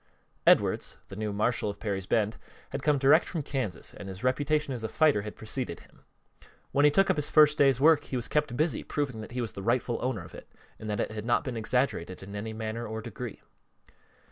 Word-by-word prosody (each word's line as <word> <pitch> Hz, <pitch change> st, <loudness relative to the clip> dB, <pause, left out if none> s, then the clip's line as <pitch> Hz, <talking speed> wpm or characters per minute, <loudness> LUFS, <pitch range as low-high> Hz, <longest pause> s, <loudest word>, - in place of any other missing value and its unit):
Edwards, -, -, +3 dB
the -, -, -8 dB
new 105 Hz, 0 st, -2 dB
marshal 105 Hz, +2 st, 0 dB
of 100 Hz, -, -6 dB
Perry's 95 Hz, -4 st, -3 dB
Bend, 110 Hz, 0 st, +1 dB, 0.3 s
had 135 Hz, -, -3 dB
come 150 Hz, +1 st, +3 dB
direct 140 Hz, +5 st, +5 dB
from 165 Hz, -5 st, -4 dB
Kansas 130 Hz, -, -4 dB
and 100 Hz, -1 st, -8 dB
his 95 Hz, +4 st, -8 dB
reputation 145 Hz, +2 st, +1 dB
as 120 Hz, -3 st, -5 dB
a 110 Hz, -, -2 dB
fighter 150 Hz, -9 st, +3 dB
had 105 Hz, +1 st, -7 dB
preceded 110 Hz, -3 st, -4 dB
him. -, -, -22 dB, 0.7 s
When 145 Hz, +1 st, +4 dB
he -, -, +8 dB
took 195 Hz, +6 st, +4 dB
up -, -, -1 dB
his 150 Hz, -, -1 dB
first 150 Hz, -1 st, +6 dB
day's 135 Hz, -4 st, +4 dB
work 150 Hz, +1 st, +5 dB
he -, -, -5 dB
was 120 Hz, -2 st, -1 dB
kept 150 Hz, -5 st, 0 dB
busy 155 Hz, +2 st, +1 dB
proving 135 Hz, -7 st, -3 dB
that 110 Hz, -, -9 dB
he 125 Hz, -, -2 dB
was 115 Hz, -4 st, -3 dB
the 100 Hz, -, -7 dB
rightful 120 Hz, +2 st, 0 dB
owner 115 Hz, -9 st, -2 dB
of -, -, -14 dB
it -, -, -12 dB, 0.3 s
and 110 Hz, -, -6 dB
that 105 Hz, -, -1 dB
it -, -, -2 dB
had 110 Hz, -1 st, -5 dB
not 120 Hz, -, +2 dB
been 130 Hz, -3 st, -4 dB
exaggerated 110 Hz, -6 st, -1 dB
in 100 Hz, +1 st, -8 dB
any 110 Hz, +2 st, -4 dB
manner 110 Hz, +1 st, -4 dB
or 110 Hz, +1 st, -4 dB
degree. 120 Hz, 0 st, -7 dB
120 Hz, 225 wpm, -29 LUFS, 105-140 Hz, 0.7 s, he